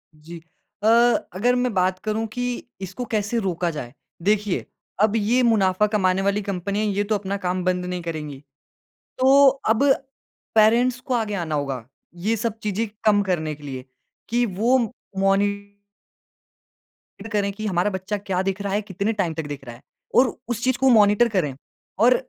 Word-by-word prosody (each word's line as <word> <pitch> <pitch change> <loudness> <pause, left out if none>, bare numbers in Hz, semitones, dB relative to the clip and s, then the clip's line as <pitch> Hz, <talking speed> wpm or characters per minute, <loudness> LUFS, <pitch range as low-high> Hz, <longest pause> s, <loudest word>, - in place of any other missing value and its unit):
जी। 160 +3 -11 0.5
अ, - - +3 0.5
अगर 240 +7 +2
मैं 250 -1 0
बात 185 -1 +1
करूँ 215 +1 -1
कि 245 0 -3 0.2
इसको 190 +6 -5
कैसे 215 +2 0
रोका 180 -3 -1
जाए। 125 -6 -7 0.3
देखिए, 205 -1 +1 0.4
अब 215 0 +3
ये 225 +4 +2
मुनाफ़ा 210 -3 +3
कमाने 190 -2 +2
वाली 200 +1 +1
कंपनियाँ 200 +1 -2
ये 205 0 0
तो 215 +1 0
अपना 200 0 -3
काम 180 -1 -2
बंद 180 0 0
नहीं 180 0 -3
करेंगी। 155 -4 -5 0.8
तो 275 +2 +6 0.2
अब 225 +5 +3 0.7
पैरेंट्स 235 +3 +4
को 255 0 -4
आगे 220 -3 0
आना 160 -4 -2
होगा। 135 -5 -3 0.4
ये 225 - +3
सब 225 0 -2
चीज़ें 210 +2 -1 0.2
कम 205 -1 +5
करने 165 -5 -1
के 145 - -17
लिए 130 -2 -6 0.4
कि 240 +1 +2
वो 230 +6 +2 0.4
मॉनि 195 +1 +3 1.7
टर 215 - -8
करें 205 -2 0
कि 215 +2 -6
हमारा 185 0 +1
बच्चा 190 +1 -3
क्या 195 -2 -2
देख 195 +1 -2
रहा 200 -1 -2
है, 205 - +1
कितने 200 +2 -2
टाइम 180 -6 -1
तक 160 -1 -4
देख 145 -2 -7
रहा 120 -1 -8
है - - -17 0.3
और 250 -2 +4
उस 235 -1 -3
चीज़ 255 -1 +2
को 265 0 +3
मॉनिटर 215 0 +5
करें 165 - -1 0.5
और 250 - +6
200 Hz, 170 wpm, -23 LUFS, 180-225 Hz, 1.7 s, तो